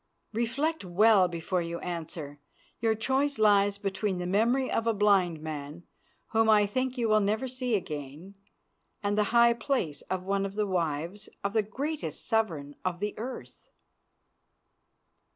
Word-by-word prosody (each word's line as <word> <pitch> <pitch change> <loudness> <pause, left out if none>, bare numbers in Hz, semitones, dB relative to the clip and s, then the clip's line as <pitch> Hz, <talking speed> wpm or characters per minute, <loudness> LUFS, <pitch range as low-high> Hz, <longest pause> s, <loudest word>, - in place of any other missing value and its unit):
Reflect 260 +8 -1
well 190 +1 +5
before 175 +1 -2
you 170 0 -4
answer. 160 -4 -6 0.4
Your 225 -1 +2
choice 265 +5 0
lies 205 -2 +4
between 195 -1 -2
the 180 - -3
memory 230 +8 +2
of 230 - 0
a 225 - +2
blind 195 -5 +3
man, 155 +1 -6 0.5
whom 225 0 +3
I 210 -1 +6
think 255 +5 -2
you 235 -2 +1
will 215 0 +4
never 215 +5 0
see 250 -2 -1
again, 155 0 -5 0.7
and 205 0 +1
the 210 0 +2
high 235 +2 +5
place 225 - -2
of 185 -1 -2
one 195 +1 0
of 195 0 -4
the 210 0 +1
wives 175 +2 -2
of 200 0 -1
the 220 - +4
greatest 265 - -4
sovereign 170 - 0
of 180 -1 -2
the 210 +1 -2
earth." 250 +4 -8
205 Hz, 150 wpm, -29 LUFS, 175-225 Hz, 0.7 s, I